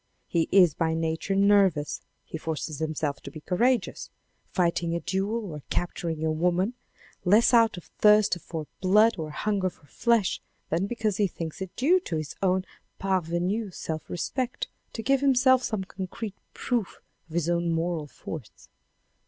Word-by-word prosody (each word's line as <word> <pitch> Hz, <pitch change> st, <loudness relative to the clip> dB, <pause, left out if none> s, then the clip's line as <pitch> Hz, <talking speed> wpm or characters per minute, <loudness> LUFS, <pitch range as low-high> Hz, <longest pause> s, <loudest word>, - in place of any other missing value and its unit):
He 165 Hz, -2 st, +1 dB
is 180 Hz, -6 st, +6 dB
by 160 Hz, +1 st, 0 dB
nature 165 Hz, +4 st, -1 dB
nervous, 195 Hz, -6 st, +3 dB, 0.2 s
he -, -, -8 dB
forces 155 Hz, -2 st, -4 dB
himself 155 Hz, -2 st, -2 dB
to -, -, -8 dB
be 155 Hz, +2 st, -10 dB
courageous, 235 Hz, +6 st, 0 dB, 0.4 s
fighting 170 Hz, -2 st, +1 dB
a -, -, 0 dB
duel 200 Hz, +3 st, -2 dB
or 150 Hz, -, -7 dB
capturing 170 Hz, -3 st, -2 dB
a 160 Hz, -, +2 dB
woman, 180 Hz, +7 st, +1 dB, 0.5 s
less 210 Hz, +7 st, +5 dB
out 230 Hz, -4 st, +5 dB
of 175 Hz, -, -8 dB, 0.2 s
thirst 210 Hz, -2 st, +6 dB
for 160 Hz, -1 st, -5 dB, 0.2 s
blood 210 Hz, +2 st, +4 dB
or 155 Hz, -1 st, -3 dB
hunger 195 Hz, +3 st, 0 dB
for 160 Hz, -, -22 dB
flesh, 230 Hz, +4 st, +1 dB, 0.3 s
than 170 Hz, +5 st, +1 dB
because 215 Hz, -3 st, -1 dB
he 205 Hz, -, +3 dB
thinks 165 Hz, -1 st, -6 dB
it 190 Hz, -2 st, -6 dB
due 335 Hz, +9 st, +4 dB
to 265 Hz, -, -4 dB
his 155 Hz, -2 st, -3 dB
own 185 Hz, -1 st, +2 dB, 0.3 s
parvenu 190 Hz, +3 st, 0 dB
self 160 Hz, -2 st, -5 dB
respect 250 Hz, +7 st, -2 dB, 0.3 s
to 225 Hz, -, -5 dB
give 270 Hz, +3 st, +3 dB
himself 260 Hz, -1 st, +5 dB
some 215 Hz, -6 st, -2 dB
concrete 190 Hz, +3 st, -6 dB, 0.2 s
proof 235 Hz, -6 st, -2 dB, 0.3 s
on 160 Hz, -, -9 dB
his 170 Hz, -2 st, +1 dB
own 170 Hz, 0 st, +1 dB
moral 165 Hz, -2 st, -1 dB
force. 145 Hz, -3 st, -9 dB
185 Hz, 160 wpm, -27 LUFS, 165-215 Hz, 0.5 s, is